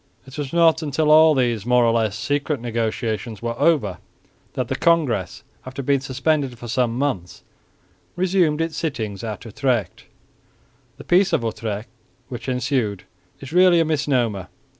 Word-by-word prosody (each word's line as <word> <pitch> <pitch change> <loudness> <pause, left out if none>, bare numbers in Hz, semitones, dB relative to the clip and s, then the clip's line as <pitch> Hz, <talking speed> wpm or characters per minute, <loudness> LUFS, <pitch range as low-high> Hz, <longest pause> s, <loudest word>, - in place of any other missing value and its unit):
It 130 0 -12
was 145 -3 -4
not 165 -1 +4
until 150 0 +1
all 155 0 +7
these 120 -5 0
more 125 +1 +3
or 115 - +3
less 110 -3 0
secret 145 +3 -1
negotiations 115 -1 -3
were 115 0 -2
over 105 - +2 0.5
that - - -2
the - - -2
Congress, 140 - +1 0.2
after 130 +2 -7
being 140 +1 +2
suspended 135 0 -1
for 120 - -9
some 120 0 0
months, 115 -11 -3 0.7
resumed 175 -4 +1
its 165 -1 -2
sittings 110 - -3
at 110 0 -6
Utrecht. 115 -4 -2 0.9
The - - -10
Peace 190 +2 +3
of - - +2
Utrecht 110 0 -4 0.4
which 125 +1 -6
ensued 125 -6 -1 0.4
is 135 +3 -9
really 180 -1 +5
a 165 - +3
misnomer. 125 - 0
130 Hz, 150 wpm, -22 LUFS, 115-155 Hz, 0.9 s, all